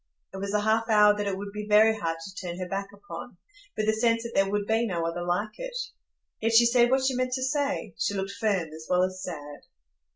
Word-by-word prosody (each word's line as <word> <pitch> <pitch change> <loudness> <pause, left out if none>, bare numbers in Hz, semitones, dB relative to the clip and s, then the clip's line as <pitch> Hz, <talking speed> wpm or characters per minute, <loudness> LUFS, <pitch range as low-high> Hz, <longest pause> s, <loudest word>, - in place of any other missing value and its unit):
It - - -6
was 200 +1 -3
a 210 0 +1
half 220 +2 +1
hour 210 -1 +6
that 205 -1 -2
it 195 -1 -1
would 200 +1 -6
be 210 0 -5
very 220 +1 +6
hard 165 -6 -2
to 190 +3 -8
turn 180 -3 -6
her 185 -1 -4
back 195 +1 -3
upon, 185 0 -10 0.4
with 215 - 0
the 220 - +3
sense 230 +1 +2
that 235 - -6
there 195 0 +2
would 205 0 -1
be 225 +2 +1
no 170 -4 -2
other 165 +1 -3
like 205 +5 -2
it. - - -5 0.6
Yet 225 +1 +1
she 235 +1 +7
said 240 0 +4
what 265 +1 +2
she 265 - +2
meant 255 0 -1
to 260 0 -1
say; 280 - -1
she 205 - 0
looked 195 0 -2
firm 200 -6 -1
as 160 0 -10
well 180 0 +3
as 185 0 -2
sad. 145 -6 -8
205 Hz, 250 wpm, -27 LUFS, 185-230 Hz, 0.6 s, she